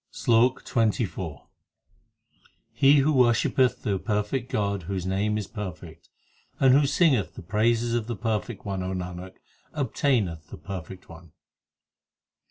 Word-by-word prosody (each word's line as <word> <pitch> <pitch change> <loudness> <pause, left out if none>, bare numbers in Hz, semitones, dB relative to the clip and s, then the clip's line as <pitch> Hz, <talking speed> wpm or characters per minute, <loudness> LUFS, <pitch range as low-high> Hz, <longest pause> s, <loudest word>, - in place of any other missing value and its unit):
SLOK 120 +2 +2
XXIV 105 - -1 1.3
He 135 +5 +5
who 150 +3 +2
worshippeth 125 0 +2
the 100 -5 -1
perfect 110 +5 -2
God 100 -2 -1
whose 95 -2 -3
name 100 +3 0
is 105 - -3
perfect, 90 -6 -8 0.5
And 130 -1 +5
who 140 +1 +4
singeth 140 - +2
the - - -9
praises 115 +5 +1
of 115 -2 -1
the 120 - -3
perfect 110 0 -3
One, 95 -2 -3
O 90 +1 -3
Nanak, 90 0 -6 0.4
obtaineth 115 - -1
the - - -9
perfect 95 -1 -8
One. 85 -1 -14
105 Hz, 130 wpm, -26 LUFS, 95-120 Hz, 1.3 s, He